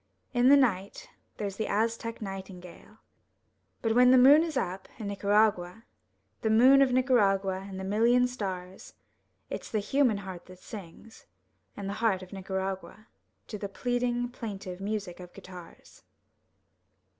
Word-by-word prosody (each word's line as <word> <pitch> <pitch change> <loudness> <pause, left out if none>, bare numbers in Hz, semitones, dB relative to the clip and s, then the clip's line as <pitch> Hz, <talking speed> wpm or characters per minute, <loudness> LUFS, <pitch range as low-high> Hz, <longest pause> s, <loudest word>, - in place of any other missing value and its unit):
In 245 +1 +4
the 285 - +8
night 200 -8 -1 0.3
there's 200 -2 -4
the 220 - -2
Aztec 230 +1 -2
nightingale. 190 -3 -9 0.9
But 225 -1 +1
when 250 +1 +6
the 260 - +7
moon 275 +5 +7
is 325 -4 -2
up, 190 -4 -3
in 215 -3 -5
Nicaragua, 200 -1 +1 0.6
The 220 - 0
moon 255 +5 +6
of 270 -2 +4
Nicaragua 200 -7 +2
and 190 -1 -7
the - - -5
million 230 +5 +3
stars. 190 -6 -7 0.6
It's - - -6
the 220 - -1
human 240 +1 +1
heart 190 -3 -9
that 185 0 -13
sings, 200 +3 -12 0.5
and 200 -1 -5
the 200 - -3
heart 195 -5 +1
of 185 - -13
Nicaragua, 190 +1 -5 0.4
To 210 - -6
the 200 - -5
pleading, 245 +3 -1
plaintive 200 -6 -7
music 200 -3 -4
of 180 -1 -11
guitars. 185 -3 -13
205 Hz, 145 wpm, -28 LUFS, 190-240 Hz, 0.9 s, the